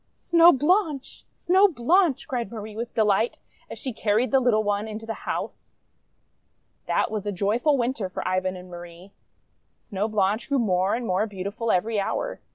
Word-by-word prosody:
Snow 340 0 +5
Blanche! 300 -1 0
Snow 380 +3 +3
Blanche!' 335 0 +1
cried 240 -6 -3
Marie 215 -2 -8
with 235 +2 -6
delight 215 +1 +2 0.3
as - - -7
she 260 - -5
carried 220 +3 0
the 270 - +5
little 235 -4 +2
one 205 +1 -1
into 220 +1 -7
the 225 - -4 0.2
house. - - -5 1.1
That - - 0
was 210 -2 -4
a - - 0
joyful 215 - +1
Winter 235 -5 -2
for - - -5
Ivan 185 0 -1
and 180 0 -10
Marie. 175 +1 -11 0.7
Snow 205 0 -3
Blanche 210 +2 0
grew 280 - +2
more 190 -4 +1
and 240 0 -4
more 195 +2 0
beautiful 205 +3 -5
every 215 +4 0
hour. - - -3
220 Hz, 165 wpm, -25 LUFS, 200-260 Hz, 1.1 s, Snow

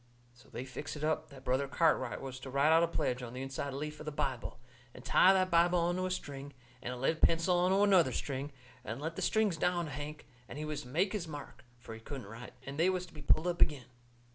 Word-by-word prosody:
So 120 - -20
they 125 - -6
fixed 145 +3 -6
it 150 - -6
up 155 0 0
that 135 -3 -13
Brother 130 +2 +1
Cartwright 140 -3 +1
was 130 -1 -6
to 135 - -8
write 140 +4 +3
out 165 +1 +6
a 170 - +3
pledge 145 -6 -1
on 120 -1 -7
the 130 - -5
inside 135 +1 -4
leaf 150 +3 -5
of 155 - -9
the - - -1
Bible, 135 -5 -3 0.4
and 125 - -12
tie 185 - +6
the 190 -1 +4
Bible 175 0 +4
onto 175 +2 +1
a - - -3
string, 145 -5 -5 0.3
and 125 - -4
a 125 - -5
lead 145 +6 0
pencil 165 +2 +4
onto 190 +3 +4
another 185 -9 +5
string, 140 +2 -3 0.3
and 115 +1 -5
let 160 +3 -4
the - - -4
strings 215 -6 +2
down 175 +1 +1
to 150 - -7
Hank, 150 +2 -6 0.2
and - - -7
he 155 - -3
was 150 -1 -3
to - - -12
make 180 - +1
his 190 -5 -3
mark, 145 -4 -9
fur 120 -1 -10
he 110 - -8
couldn't 130 +1 -7
write, 115 +5 -10
and 140 +2 -6
they 175 +3 +5
was 185 -1 -1
to 180 - -18
be 150 - -9
pulled 155 - +3
up 175 -1 -1
agin. 145 -5 +3
150 Hz, 255 wpm, -33 LUFS, 135-170 Hz, 0.4 s, out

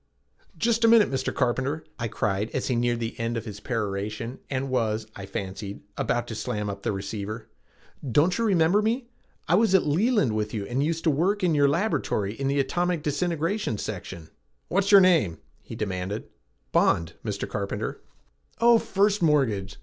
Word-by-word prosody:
"Just 230 0 +1
a - - +7
minute, 225 -6 +6
Mr. 130 -1 -1
Carpenter," 135 +4 -1 0.2
I 120 - -1
cried 105 -1 -1
as 130 - -1
he 125 - +1
neared 120 0 +1
the 115 0 -4
end 115 +1 -1
of 115 - -5
his 105 -2 -7
peroration 110 +1 -3
and 135 -1 -2
was, 110 -3 0
I 100 -1 -8
fancied, 100 +1 -5
about 120 0 0
to - - -4
slam 105 -2 -3
up 100 0 -8
the - - -1
receiver. 100 0 -5 0.6
"Don't 160 +9 +3
you 230 - 0
remember 190 -1 +3
me? 235 +3 -1 0.4
I - - +2
was 200 +1 +4
at 190 - +4
Leland 175 - +2
with 105 0 -2
you 100 -2 -3
and 125 +5 -1
used 165 +2 -1
to 160 - +4
work 185 +8 +1
in 175 -3 +3
your 145 -1 +4
laboratory 145 - 0
in 135 +4 -3
the 140 +1 +1
atomic 175 +3 0
disintegration 165 - -1
section." 90 -6 -6 0.4
"What's 195 +2 +1
your 200 -1 +9
name?" 160 - +3 0.2
he - - -9
demanded. 95 0 -4 0.4
"Bond, 80 -1 +2
Mr. - - -3
Carpenter." - - -4 0.6
"Oh, 235 0 +6
First 205 0 +1
Mortgage! 125 - +1
130 Hz, 175 wpm, -26 LUFS, 105-180 Hz, 0.6 s, your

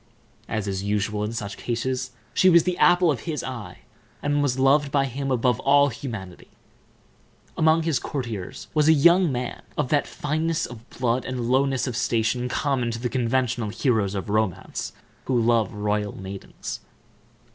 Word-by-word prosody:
As 110 -3 -2
is 95 -1 -2
usual 105 +1 -1
in 105 - -2
such 105 -3 -5
cases, 125 +2 -2 0.2
she 185 - +5
was 170 -2 +6
the 180 -1 0
apple 175 -2 +5
of 135 - -2
his 150 -3 -2
eye, 125 -5 -7 0.4
and 145 0 +1
was 135 -3 +1
loved 140 +2 +3
by 140 -1 +2
him 135 +1 -4
above 125 -2 +2
all 140 +1 +4
humanity. 110 -8 -7 1.1
Among 160 0 +3
his 160 -4 +1
courtiers 115 -9 -5
was 150 -1 +3
a 160 - +8
young 170 +3 +5
man 125 -1 -4 0.2
of 150 -4 0
that 145 -1 +2
fineness 155 +2 -1
of 120 0 -11
blood 125 0 0
and 125 -2 -3
lowness 135 0 +2
of 125 -4 -3
station 120 +2 0
common 135 -3 0
to 115 0 -4
the 120 +1 -2
conventional 125 -2 0
heroes 110 -4 0
of 95 - -3
romance 110 -4 -1 0.3
who 125 -2 +1
love 115 -3 +2
royal 105 -1 -2
maidens. 95 0 -7
125 Hz, 165 wpm, -24 LUFS, 110-145 Hz, 1.1 s, a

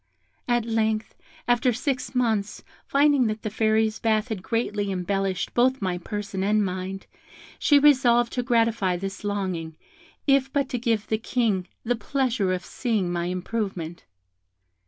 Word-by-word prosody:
At 240 -2 +1
length, 220 -1 0 0.3
after 245 +1 +3
six 255 +2 -2
months, 220 -5 0 0.2
finding 280 -3 +4
that 215 0 -3
the 215 - -3
Fairies' 220 0 +1
bath 220 +1 +1
had 215 -5 -3
greatly 210 -1 -1
embellished 190 0 -1
both 255 +2 +3
my 185 -3 -2
person 200 0 -4
and 210 +1 +2
mind, 185 +1 -4 0.5
she 290 - +5
resolved 250 -5 +4
to 250 - 0
gratify 230 -6 +1
this 195 +2 -6
longing, 185 -6 -3 0.5
if 275 -1 +3
but 280 -1 0
to 250 -3 -2
give 225 -3 0
the 220 - -1
King 220 -6 0 0.2
the 245 +1 +1
pleasure 235 -4 0
of 185 0 -2
seeing 215 -8 -1
my 175 -1 -1
improvement. 180 -2 -4
220 Hz, 145 wpm, -25 LUFS, 195-245 Hz, 0.5 s, she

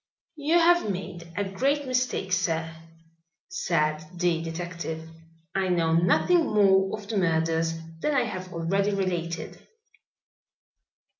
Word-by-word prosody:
"You 300 +3 +1
have 345 -7 +4
made 175 -3 -5
a 205 - +1
great 270 +10 0
mistake, 250 -7 -1
sir," 165 -3 0 0.7
said 155 - 0
the 175 -2 +1
detective. 165 -1 -5 0.5
"I 195 -1 0
know 165 -2 +2
nothing 180 - +4
more 195 -1 +3
of 205 -2 -11
the 215 0 -2
murders 165 -2 +1 0.3
than 300 - +1
I 255 - +4
have 185 -5 -5
already 195 +5 0
related." 175 -3 -3
185 Hz, 120 wpm, -26 LUFS, 165-210 Hz, 0.7 s, have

